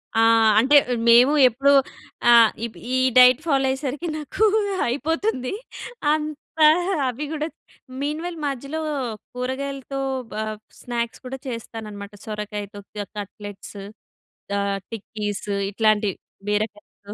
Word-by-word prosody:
ఆ! - - +3 0.4
అంటే 270 +6 +4 0.3
మేము 245 +5 +7
ఎప్పుడూ 270 +4 +2 0.6
ఆహ్, 230 -2 +7 0.4
ఈ - - +3 0.2
డైట్ 250 +2 +8
ఫాలో 275 -4 +2
అయ్యేసరికి 275 +4 -3
నాకు 310 +8 0 0.4
అయిపోతుందీ. 285 - -1 0.6
అంత 305 -1 -2 0.7
అవి 255 +4 -3
కూడా 310 0 -2 0.5
మీన్ 300 +2 -2
వైల్ 350 -1 -5
మధ్యలో 275 +3 -4 0.5
కూరగాయలతో 270 +2 -4 0.3
ప - - -7 0.5
స్నాక్స్ 235 -1 -3
కూడా 260 +1 -5
చేస్తాననమాట. 215 -4 -7
సొరకాయతో 210 -1 -6 0.4
కట్లెట్స్ 205 0 -9 0.8
ఆహ్, 200 0 0
టిక్కీస్ 210 -2 -5 0.3
ఇట్లాంటి 215 -1 +2 0.4
బీరకాయతో. 210 -1 -4
250 Hz, 100 wpm, -23 LUFS, 210-280 Hz, 0.8 s, డైట్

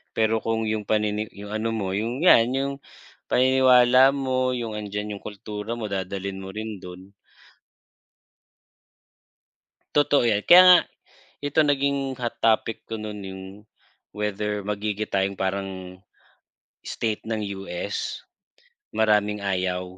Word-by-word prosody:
pero 110 0 +2
kung 115 0 -1
yung 110 -1 -2
panini 105 0 0
yung 100 +1 -9
ano 110 +1 -2
mo 100 -4 -2
yung 115 - -2
yan 115 -10 +6
yung 135 +1 -1 0.5
paniniwala 130 0 +5
mo, 130 -2 0
yung 115 -3 -4
andiyan 105 0 -5
yung - - -27
kultura 105 +2 -6
mo 110 -3 -5
dadalhin 95 0 -4
mo 95 0 -8
rin 110 -2 -5
dun. 90 +2 -11 2.8
Totoo 145 -4 +3
yan. 105 -2 +1
Kaya 180 +1 +9
nga 180 -1 +10 0.6
ito 145 +2 +1
naging 140 -2 0
hot 120 -1 -3
topic 115 0 +1
ko 115 - -6
nun 105 -1 -7
yung 95 0 -8 0.7
whether 105 0 -3
magigita 105 -1 -2
yong 95 0 -3
parang 95 -1 -4 0.8
state 110 -2 -3
ng 110 -1 -3 0.2
US. 100 +2 -4 0.8
Maraming 105 -1 +2
ayaw, 95 -2 -1
105 Hz, 125 wpm, -24 LUFS, 100-120 Hz, 2.8 s, nga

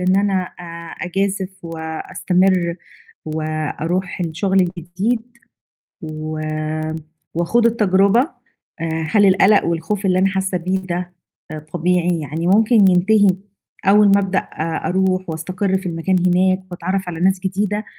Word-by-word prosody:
إن 185 +1 +2
أنا 195 -2 +2 0.2
أ - - -9 0.4
أجازف 195 +1 -1
وأستمر 170 +2 0 0.5
وأروح 155 +4 -3
الشغل 185 +4 +1
الجديد 185 +6 -1 0.8
و 155 0 -5 0.9
وأخوض 175 +8 +1
التجرُبة؟ 205 -1 +3 0.6
آآ، 160 -1 -2
هل 205 -2 +5
القلَق 195 +2 +5
والخوف 170 +5 -2
اللي 185 -1 +3
أنا 195 - +4
حاسّة 190 -1 -1
بيه 185 +2 -1
ده 180 -1 -4 0.4
آآ 155 - -5
طبيعي؟ 175 0 +1
يعني 155 +4 -3
ممكن 220 +5 +4 0.2
ينتهي 200 +3 +4 0.6
أول 205 +1 +6
ما 200 0 +5
أبدأ 190 -1 0
أ 160 +1 -4
أروح 185 -1 0
وأستقر 185 +4 -1
في 190 - -9
المكان 170 +2 -1
هناك 185 +1 +3
وأتعرّف 185 +2 -3
على 165 -2 -6
ناس 190 +1 +2
جديدة 205 +3 -2
185 Hz, 125 wpm, -19 LUFS, 170-195 Hz, 0.9 s, أول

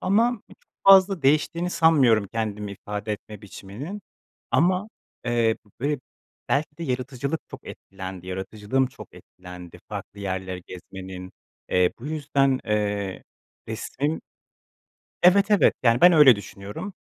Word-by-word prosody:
ama 225 +4 +2
çok - - -16 0.3
fazla 195 -3 +7
değiştiğini 160 +5 +2
sanmıyorum 130 - +4
kendimi 105 -2 -3
ifade 105 +2 -5
etme 105 +1 -9
biçiminin. 110 - -8 0.5
Ama, 185 +5 +2 0.4
eee, 115 -2 +2 0.2
b 140 - 0
be 145 - -1 0.5
belki 150 +1 0
de 170 - -5
yaratıcılık 135 +3 -3
çok - - -11
etkilendi, 95 -1 -9
yaratıcılığım 105 +7 -1
çok 130 - -12
etkilendi 90 -1 -12
farklı 100 - -7
yerleri 95 -1 -4
gezmenin. 95 0 -9 0.4
Eee, 90 -1 +3
bu 125 - -9
yüzden, 140 -3 +1
eee, 105 -2 -1 0.5
resmin 140 +7 -3 1.0
Evet, 200 +4 +5
evet, 205 - +5
yani, 115 0 +4
ben 180 0 +8
öyle 150 -7 +8
düşünüyorum. 100 - -8
120 Hz, 125 wpm, -24 LUFS, 100-155 Hz, 1.0 s, ben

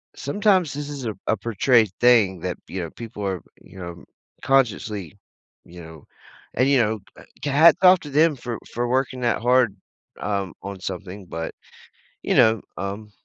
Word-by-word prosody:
sometimes 185 +1 +1
this 145 0 -5
is 140 -3 -6
a 110 - -2
a 110 - +2
portrayed 115 +1 +2
thing 110 -7 +5
that, 90 0 -3
you 95 - -4
know, 85 - -5
people 115 -3 -8
are, 95 -2 -2 0.2
you - - -16
know, 85 -1 -8 0.4
consciously, 105 - 0 0.5
you 85 0 -12
know 80 -2 -13 0.5
and 130 - +3
you 140 - +4
know, 110 -1 0 0.2
uh, - - -13 0.2
hats 145 +4 +6
off 185 0 +8
to 150 - -9
them 155 +2 +4
for 120 -2 -5 0.2
for 120 +1 -1
working 130 0 0
that 120 -2 0
hard, 125 -4 +3 0.4
um, 100 -4 -2
on 100 -1 -6
something, 95 +1 -6
but, 80 0 -5 0.7
you - - 0
know, 110 -2 +5 0.2
um 100 +2 -5
110 Hz, 170 wpm, -23 LUFS, 95-135 Hz, 0.7 s, off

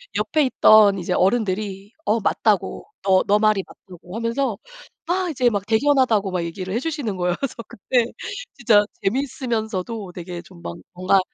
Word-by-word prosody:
옆에 310 -1 +1
있던 215 -5 +6
이제 175 - -2
어른들이 195 -1 0
"어 220 +2 +2
맞다."고 205 - 0 0.2
"너 190 -1 +4
너 205 +1 +4
말이 215 -2 +3
맞다."고 180 0 -13
하면서 230 0 -1 0.5
막 365 +1 0
이제 250 -4 +2
막 205 -3 -2
"대견하다."고 225 -4 +2
막 180 -2 -1
얘기를 185 +3 -5
해 230 - +1
주시는 275 - -3
거예요. 180 -1 0
그래서 275 -4 -3
그때 240 +4 0 0.5
진짜 220 -5 +5 0.2
재미있으면서도 220 -4 -2
되게 175 0 -7
좀 175 -1 -16
막 85 - -6 0.2
뭔가 185 +2 +3
210 Hz, 340 characters per minute, -22 LUFS, 185-240 Hz, 0.5 s, 있던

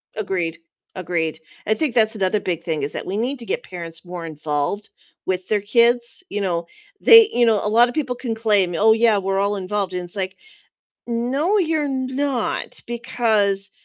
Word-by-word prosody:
Agreed. 180 -6 -2 0.4
Agreed. 165 -3 -2 0.3
I 215 - +4
think 305 -7 -1
that's 220 -1 +3
another 195 +1 +1
big 170 -3 -3
thing 155 -4 -2
is 145 - -2
that - - -5
we 195 +3 -3
need 250 +4 -2
to 235 - -9
get - - -3
parents 170 -2 -8
more 175 -1 -7
involved 150 +5 -3 0.4
with 185 0 -2
their 210 -2 +1
kids, 235 - +2
you 205 - -3
know, 170 -3 -1 0.3
they 455 -2 +8
you 240 0 +3
know, 220 -3 +2
a 210 - 0
lot 235 +3 +5
of 245 - -6
people 265 -5 -2
can 240 -2 -4
claim, 205 -5 +1
"Oh, 220 +5 +5
yeah, 225 -2 +3
we're 195 0 -1
all 200 +1 +1
involved," 195 0 -3
and 180 - -2
it's 175 +3 -5
like, 190 -1 -3 0.7
"No, 265 - 0
you're 315 -5 +1
not, 260 -1 -2
because 220 -4 0
210 Hz, 185 wpm, -21 LUFS, 185-240 Hz, 0.7 s, they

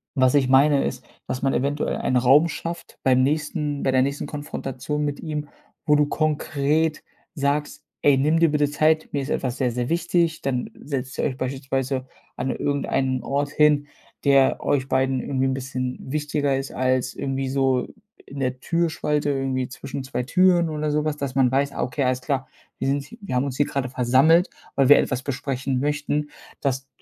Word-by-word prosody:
was 130 0 +3
ich 130 -2 +3
meine, 140 +1 +5
ist, 125 -1 -4 0.2
dass 125 - -3
man 135 0 +1
eventuell 140 +3 -1
einen 130 - +1
Raum 135 +6 +5
schafft 170 +1 -6
beim 130 -1 +4
nächsten 150 0 -1
bei 135 - +2
der 130 0 +4
nächsten 140 +1 -3
Konfrontation 145 0 -4
mit 145 -1 -3
ihm, 150 -2 -4 0.4
wo 150 -1 +4
du 150 - +4
konkret 155 0 0 0.3
sagst: 145 +1 -1 0.2
„Ey, 145 -2 +5
nimm 150 +4 +2
dir 165 -2 +4
bitte 145 -1 +2
Zeit, 155 +2 +2
mir 140 - -1
ist 135 - -6
etwas 130 -2 -2
sehr 125 -2 +1
sehr 120 +1 -2
wichtig.“ 170 -1 +1
Dann 125 -2 -1
setzt 130 -3 -5
ihr - - -1
euch 130 -3 -2
beispielsweise 135 0 -2 0.3
an 130 +1 -1
irgendeinen 135 -2 -1
Ort 145 +1 -1
hin, 150 -1 +3 0.4
der 140 -2 +4
euch 135 -2 +1
beiden 130 0 +1
irgendwie 135 +1 -1
'n 130 - 0
bisschen 130 -1 -4
wichtiger 145 -1 -1
ist 135 +1 -4
als 130 0 0
irgendwie 135 -1 -2
so 135 -2 +1 0.4
in 140 - -9
der 130 -1 -1
Türspalte 160 -3 0
irgendwie 135 -2 -1
zwischen 135 +1 -6
zwei 125 -1 -3
Türen 175 +3 +3
oder 155 -1 -2
sowas, 150 0 0
dass 140 -2 -4
man 130 -2 +3
weiß: 140 +1 +1
„Ah, - - -2
okay, 130 +3 -2
alles 130 0 0
klar, 135 -1 -2 0.3
wir - - -1
sind 140 +11 -2
wir 190 -11 -4
haben 125 - +2
uns 135 -2 -4
hier 145 - +3
grade 135 -2 -2
versammelt, 130 +8 +4 0.3
weil 135 -2 +3
wir 145 - +9
etwas 130 0 -1
besprechen 135 -1 -2
möchten“, 150 0 -1 0.3
dass 135 -1 -1
140 Hz, 185 wpm, -23 LUFS, 130-150 Hz, 0.4 s, wir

